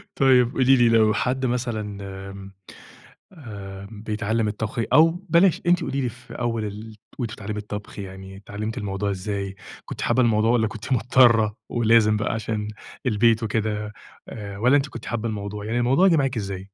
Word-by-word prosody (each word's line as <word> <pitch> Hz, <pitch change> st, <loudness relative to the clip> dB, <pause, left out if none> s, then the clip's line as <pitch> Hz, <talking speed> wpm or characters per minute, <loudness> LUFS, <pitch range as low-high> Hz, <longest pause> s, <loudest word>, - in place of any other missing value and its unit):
طيب 125 Hz, -3 st, +4 dB
قُولي 135 Hz, 0 st, +4 dB
لي 120 Hz, -2 st, +4 dB
لو 110 Hz, -2 st, +4 dB
حد 130 Hz, +4 st, -1 dB
مثلًا 115 Hz, -5 st, -2 dB, 0.3 s
آمم، 95 Hz, 0 st, -10 dB, 0.8 s
آآ، 100 Hz, -, -9 dB
بيتعلم 110 Hz, +1 st, -2 dB
الطبخ 110 Hz, +2 st, -3 dB
أو 160 Hz, +4 st, +7 dB, 0.2 s
بلاش، 175 Hz, +2 st, +4 dB
أنتِ 175 Hz, 0 st, +4 dB
قُولي 140 Hz, -, -2 dB
لي 125 Hz, -, 0 dB
في 120 Hz, +1 st, -12 dB
أول 115 Hz, -2 st, -2 dB
ال 105 Hz, +1 st, -7 dB, 0.2 s
وأنتِ 115 Hz, -3 st, -3 dB
بتتعلمي 105 Hz, 0 st, -5 dB
الطبخ 105 Hz, 0 st, -7 dB
يعني 95 Hz, 0 st, -8 dB
اتعلمتِ 105 Hz, +2 st, -5 dB
الموضوع 100 Hz, 0 st, -2 dB
إزاي، 100 Hz, 0 st, -4 dB, 0.3 s
كنتِ -, -, -7 dB
حابة 130 Hz, -, +2 dB
الموضوع 110 Hz, -1 st, +3 dB
والّا 115 Hz, -2 st, +3 dB
كنتِ 110 Hz, +4 st, -6 dB
مضطرة 115 Hz, -3 st, +4 dB
ولازم 115 Hz, -2 st, +4 dB
بقى 105 Hz, -, -1 dB
عشان 110 Hz, -1 st, -3 dB, 0.4 s
البيت 115 Hz, 0 st, +3 dB
وكده 105 Hz, -1 st, -2 dB, 0.4 s
آآ، 100 Hz, -3 st, -7 dB
والّا 125 Hz, +6 st, +4 dB
أنتِ 140 Hz, 0 st, +1 dB
كنتِ -, -, -9 dB
حابة 115 Hz, 0 st, -2 dB
الموضوع، 105 Hz, -1 st, -5 dB
يعني 115 Hz, +3 st, -1 dB
الموضوع 135 Hz, +10 st, +4 dB
جه 165 Hz, -, +4 dB
معاكِ 135 Hz, -3 st, 0 dB
إزاي؟ 100 Hz, -3 st, -4 dB
110 Hz, 170 wpm, -23 LUFS, 105-120 Hz, 0.8 s, أو